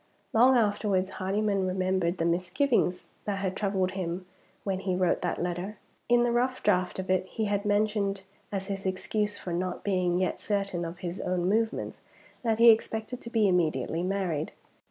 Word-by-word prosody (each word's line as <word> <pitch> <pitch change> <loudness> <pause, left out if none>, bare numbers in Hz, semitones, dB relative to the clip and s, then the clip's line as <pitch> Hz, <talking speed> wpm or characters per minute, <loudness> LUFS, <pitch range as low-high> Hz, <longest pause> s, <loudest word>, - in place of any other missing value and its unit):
Long 250 +3 +6
afterwards, 205 -3 +1
Hardyman 195 0 0
remembered 185 -1 0
the 165 - 0
misgivings 180 - +1 0.2
that 205 -2 -1
had 190 -1 -2
troubled 195 -2 0
him 185 -1 -4 0.4
when 190 -2 -1
he 190 -1 -1
wrote 180 -1 +1
that 175 - -1
letter. 180 +4 -3 0.3
In 240 0 +5
the 240 - +2
rough 250 +2 0
draught 180 0 +2
of 190 0 -2
it, 185 0 +1
he 220 +3 -2
had 205 0 -1
mentioned, 205 -1 +1 0.3
as 195 -2 -2
his 195 -1 -3
excuse 210 +2 -1
for 175 - -5
not 180 +1 -2
being 180 -3 +1
yet 185 0 0
certain 195 -4 -1
of 165 +1 -6
his 175 +2 -4
own 180 -1 0
movements, 220 +3 0 0.4
that 225 -3 +1
he 230 0 +9
expected 220 +2 -1
to 235 - -7
be 225 -3 +3
immediately 170 -2 +1
married. 180 -5 -1
195 Hz, 175 wpm, -28 LUFS, 180-210 Hz, 0.4 s, he